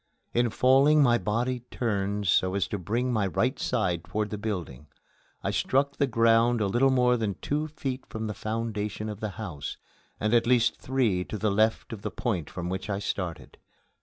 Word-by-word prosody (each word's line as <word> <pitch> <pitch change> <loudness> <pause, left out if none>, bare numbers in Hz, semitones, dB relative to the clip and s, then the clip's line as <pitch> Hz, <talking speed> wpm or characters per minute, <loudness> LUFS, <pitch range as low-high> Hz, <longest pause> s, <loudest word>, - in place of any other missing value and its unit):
In 120 0 +2
falling 135 +6 +5
my 120 -3 +4
body 120 +4 -1
turned 105 -3 -1
so 95 +1 +2
as 100 -5 +1
to 105 - -3
bring 120 +8 -1
my 105 -3 +1
right 125 - 0
side 90 -9 0
toward 105 +5 -3
the 105 - -3
building. 85 - -4 0.6
I - - 0
struck 140 +2 +1
the 140 - +2
ground 115 0 +4
a 105 - +1
little 120 +7 +3
more 125 -1 +3
than 105 -4 -1
two 150 +2 -2
feet 135 -4 -5
from 110 0 -5
the 105 - -3
foundation 110 -1 -3
of 105 -1 -6
the 110 - -3
house, 85 -10 -5 0.4
and 105 +2 0
at 115 -1 +4
least 120 -1 +3
three 120 -9 +1
to 110 - -5
the 105 0 0
left 110 +3 +1
of 105 - -7
the - - -3
point 100 - -2
from 90 -1 -5
which 95 +3 -4
I 100 - 0
started. 90 -4 -4
110 Hz, 195 wpm, -27 LUFS, 100-125 Hz, 0.6 s, falling